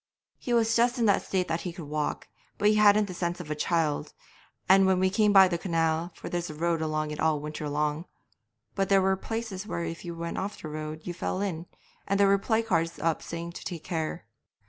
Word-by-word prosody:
'He 245 - -5
was 230 -1 +3
just 240 +2 +3
in 235 - +2
that 200 - +4
state 185 -2 -1
that 165 +1 -1
he 180 - -4
could 170 -2 -9
walk, 150 +1 -3 0.3
but 205 - +2
he - - +4
hadn't 210 0 +5
the 185 - -7
sense 175 0 -2
of 160 -4 -7
a - - -1
child, 155 -1 0 0.5
and 190 +1 +6
we 185 0 +2
came 210 +1 +3
by 195 -2 +8
the 170 -2 -2
canal, 165 -1 0
for - - -9
there's 175 -1 -3
a 155 - -7
road 165 +1 0
along 155 -1 -1
it 150 - -6
all 155 -2 +2
winter 150 0 -5
long, 150 +2 -1 0.7
but 195 -1 -1
there 195 -1 +5
were 190 0 +2
places 215 -1 -5
where 170 - -3
if 165 0 -5
you 170 -1 -6
went 170 0 -4
off 200 +2 -4
the 155 - -7
road 155 +1 -5
you 175 - -4
fell 185 - -3
in, 175 -4 -3 0.4
and 200 0 +1
there 200 - +6
were 195 0 +4
placards 190 -7 0
up 165 -1 0
saying 170 0 -6
to - - -9
take 170 -3 -6
care. 160 -4 -3
175 Hz, 230 wpm, -28 LUFS, 160-195 Hz, 0.7 s, by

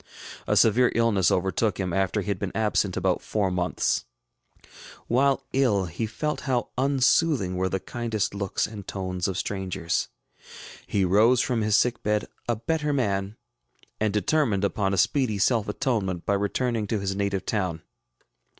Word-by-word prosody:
A - - +2
severe 120 +3 +4
illness 110 -7 +3
overtook 95 +4 0
him 90 -3 -2
after 95 +2 +1
he 105 - -6
had 100 -3 -1
been 100 -3 -3
absent 105 -3 +1
about 95 -1 +1
four 100 -3 -1
months. 90 0 0 1.0
While 135 +2 +2
ill, 115 -8 +2
he 90 +7 -3
felt 150 +8 -3
how 125 -2 0
unsoothing 135 - +2
were 95 +1 0
the 95 - -1
kindest 110 +1 -3
looks 100 -2 -1
and 105 -3 -9
tones 90 -2 -3
of 95 -2 -3
strangers. 95 -5 -2 0.8
He 100 -2 +1
rose 110 +7 +4
from 120 -2 0
his 105 0 +3
sick 120 -2 +1
bed 105 0 0 0.2
a 120 - +2
better 150 +6 -1
man, 100 -6 -1 0.6
and 110 -1 +1
determined 105 - +1
upon 100 -1 0
a 95 - 0
speedy 120 +2 +2
self 110 +1 +2
atonement 105 - -1
by 100 - +1
returning 105 +2 -1
to 110 0 -1
his 95 0 -2
native 100 -1 -1
town. 90 -7 -2
105 Hz, 160 wpm, -26 LUFS, 95-120 Hz, 1.0 s, severe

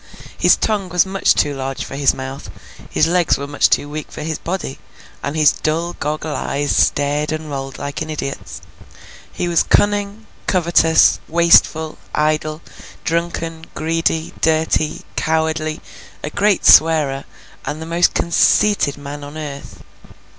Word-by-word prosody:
His - - +4
tongue 205 -4 -1
was 180 +1 +3
much 195 0 +2
too 145 - +1
large 135 0 -4
for - - -8
his 140 -1 +3
mouth, 135 +1 -7 0.4
his - - +2
legs 175 0 +2
were 140 - -5
much 145 0 +2
too 145 - +1
weak 150 +1 -7
for 155 - -7
his 160 0 -3
body, 170 -6 -4 0.4
and 145 - -4
his 155 -1 +5
dull 165 +3 -2
goggle 150 0 -3
eyes 145 +1 -1
stared 145 +2 +1
and 155 -1 -5
rolled 135 -1 -5
like 140 +1 -5
an 155 - -4
idiot's. 140 -3 -6 0.7
He 175 - -3
was 170 -2 +3
cunning, 205 +1 +1 0.2
covetous, 170 -3 +4
wasteful, 160 -1 +3 0.2
idle, 155 +1 -1 0.4
drunken, 165 -1 -3
greedy, 165 0 -1
dirty, 160 -1 +1
cowardly, 160 0 -1 0.4
a 150 - -4
great 205 +2 +1
swearer, 150 -4 +5 0.4
and 150 - -4
the 160 - -6
most 170 +2 +2
conceited 170 -2 +2
man 145 0 -8
on 145 +2 -9
earth. 145 -3 -8
155 Hz, 145 wpm, -18 LUFS, 145-170 Hz, 0.7 s, his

